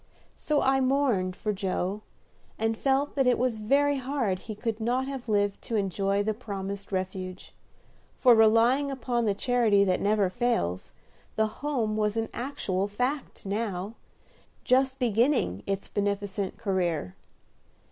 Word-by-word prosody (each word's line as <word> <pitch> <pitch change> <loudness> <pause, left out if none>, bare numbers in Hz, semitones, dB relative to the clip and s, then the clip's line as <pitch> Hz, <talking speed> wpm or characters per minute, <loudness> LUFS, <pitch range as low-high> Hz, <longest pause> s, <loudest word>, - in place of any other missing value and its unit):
So 300 -2 0
I 270 0 +3
mourned 255 -9 +1
for 210 +1 -2
Joe, 190 +1 -2 0.6
and 225 0 0
felt 275 +4 +1
that 270 -3 +2
it 250 - +4
was 245 -2 0
very 280 +6 +2
hard 255 -8 -1
he 215 +1 -7
could 225 0 -3
not 245 +4 0
have 265 -4 -6
lived 205 -1 +1
to 230 - -3
enjoy 200 0 0
the 215 +1 0
promised 200 -3 -6
refuge; 185 -1 -4 0.6
for, 250 -2 +6
relying 230 +5 +4
upon 245 -3 -1
the 205 -2 +1
charity 225 -3 +3
that 185 -2 +1
never 205 -1 +2
fails, 185 - -1 0.4
the 220 +1 -1
Home 250 -8 0
was 210 0 0
an 225 0 -1
actual 200 -7 -2
fact 250 +7 -3
now, 200 -1 -3 0.7
just 265 +1 +2
beginning 235 - +1
its 195 0 -2
beneficent 200 -1 -2
career. 175 - -1
215 Hz, 140 wpm, -27 LUFS, 195-250 Hz, 0.7 s, for